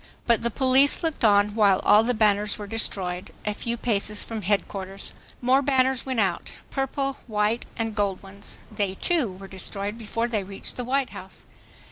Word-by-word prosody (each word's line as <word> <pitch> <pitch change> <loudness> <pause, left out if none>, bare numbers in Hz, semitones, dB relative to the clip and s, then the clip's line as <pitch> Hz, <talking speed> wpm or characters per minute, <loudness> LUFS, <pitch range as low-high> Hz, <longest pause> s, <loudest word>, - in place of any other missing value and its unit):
But 235 -2 +3
the 235 - 0
police 265 +6 +4
looked 320 -6 -2
on 205 -1 +4
while 205 -4 +4
all 210 - +6
the 240 +2 0
banners 210 -1 +2
were 210 - -6
destroyed, 190 -4 -2 0.2
a 210 - 0
few 235 +3 -3
paces 210 -3 +1
from 225 -2 -5
Headquarters. 195 0 -2 0.3
More 260 +3 +4
banners 265 -1 +2
,went 260 -3 -1
out,—purple, 270 +8 -2
white 215 +1 0
and 225 -1 -2
gold 200 -3 -1
ones. 200 +1 -9
They, 195 -2 -1
too, 310 - 0
were 190 +1 -10
destroyed 200 +3 -5
before 230 +1 -2
they 215 -4 -1
reached 195 +1 -8
the 250 - -3
White 265 +2 0
House. - - -11
215 Hz, 170 wpm, -25 LUFS, 200-250 Hz, 0.3 s, all